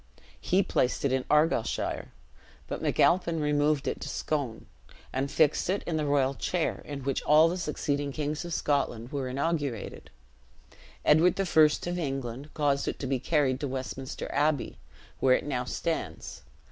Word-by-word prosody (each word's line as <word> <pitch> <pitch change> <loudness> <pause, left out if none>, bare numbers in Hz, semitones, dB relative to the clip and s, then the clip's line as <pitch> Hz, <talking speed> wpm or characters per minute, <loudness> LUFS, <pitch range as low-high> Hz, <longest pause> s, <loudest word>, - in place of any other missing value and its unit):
He 190 +2 +2
placed 125 -3 0
it 140 - +2
in 130 -1 0
Argyleshire; 150 -5 +1 0.6
but - - -4
MacAlpine 170 -2 +2
removed 150 -1 +1
it - - -2
to - - -5
Scone, 140 -7 -3 0.5
and 135 +2 -1
fixed 155 +3 +2
it 195 +2 0
in 165 -2 -2
the 150 -1 -1
royal 140 -2 +2
chair 170 +5 -1
in 140 -2 -6
which 135 0 -1
all 155 +2 +6
the 170 - -1
succeeding 145 -4 -2
kings 150 +2 -3
of 175 - -7
Scotland 130 -7 -1
were 140 -3 -2
inaugurated. 140 -3 -3 1.0
Edward 170 +5 +5
I. - - +3
of 165 +1 +3
England 135 -2 -4
caused 140 -2 +1
it - - -2
to - - -5
be 135 -1 0
carried 135 -2 +1
to 145 - -2
Westminster 130 0 -5
Abbey, 145 0 0 0.4
where 130 -1 +5
it - - -2
now 125 -4 -2
stands. 160 - -4
145 Hz, 160 wpm, -28 LUFS, 135-155 Hz, 1.0 s, all